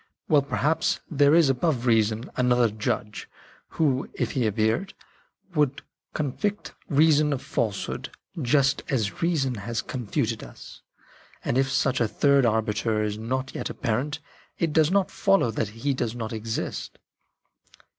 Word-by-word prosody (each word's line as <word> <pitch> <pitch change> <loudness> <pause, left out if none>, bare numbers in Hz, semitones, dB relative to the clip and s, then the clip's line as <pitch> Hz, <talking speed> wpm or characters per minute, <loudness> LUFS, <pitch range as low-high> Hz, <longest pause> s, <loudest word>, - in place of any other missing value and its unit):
Well, 150 -2 +5
perhaps, 150 +4 0
there 145 0 +5
is 165 -3 +6
above 135 -1 0
reason 110 0 +2
another 125 -2 +3
judge 105 0 -3 0.5
who, 140 -4 +1
if - - -1
he 125 -5 +1
appeared, 110 - 0 0.6
would 150 -4 +1 0.3
con 145 -3 -1
vict 205 +8 -3 0.2
reason 150 0 +4
of 140 - -2
falsehood, 105 -4 -2 0.3
just 140 +1 +2
as 110 -7 -1
reason 155 -7 +1
has 115 +1 -4
con 125 -4 -6
futed 110 +2 -1
us. - - -12 0.6
And - - 0
if 135 +1 +2
such 135 -2 +1
a 115 - +3
third 140 +3 +3
arbiter 110 0 0
is 105 0 -3
not 130 +4 -3
yet - - -4
apparent, 130 +7 -2 0.4
it 165 -3 0
does 155 -1 +4
not 195 0 +2
follow 195 - +2
that 110 0 -1
he 115 +6 -2
does 120 -3 -2
not 115 -2 -4
exist." 110 0 -4
130 Hz, 145 wpm, -25 LUFS, 110-150 Hz, 0.6 s, is